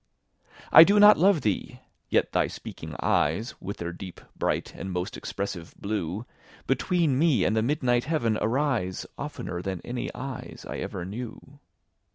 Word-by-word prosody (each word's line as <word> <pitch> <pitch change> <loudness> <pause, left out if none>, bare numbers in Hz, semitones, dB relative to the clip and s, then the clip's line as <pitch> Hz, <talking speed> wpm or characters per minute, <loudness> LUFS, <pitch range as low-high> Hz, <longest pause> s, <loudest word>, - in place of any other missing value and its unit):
I 160 - +12
do 200 +4 +4
not 210 -3 +8
love 185 -2 +4
thee!—yet 105 -4 -2
thy - - +2
speaking - - -8
eyes, 85 +11 +1
With 100 +3 -5
their 85 0 -4
deep, 90 0 -9 0.2
bright, - - -1
and 95 - -5
most 90 +3 -3
expressive 95 -4 -5
blue, 100 0 -3 0.4
Between 145 0 +1
me 145 - +3
and 110 - +2
the 110 - +3
midnight 120 -1 +1
heaven 135 -8 +1
arise, 120 -7 0
15 - - -16
Oftener 90 -1 -5
than 95 -1 -3
any 120 0 -4
eyes 135 0 -7
I - - -5
ever 90 -2 -4
knew. 125 +7 -8
115 Hz, 155 wpm, -27 LUFS, 95-140 Hz, 0.4 s, I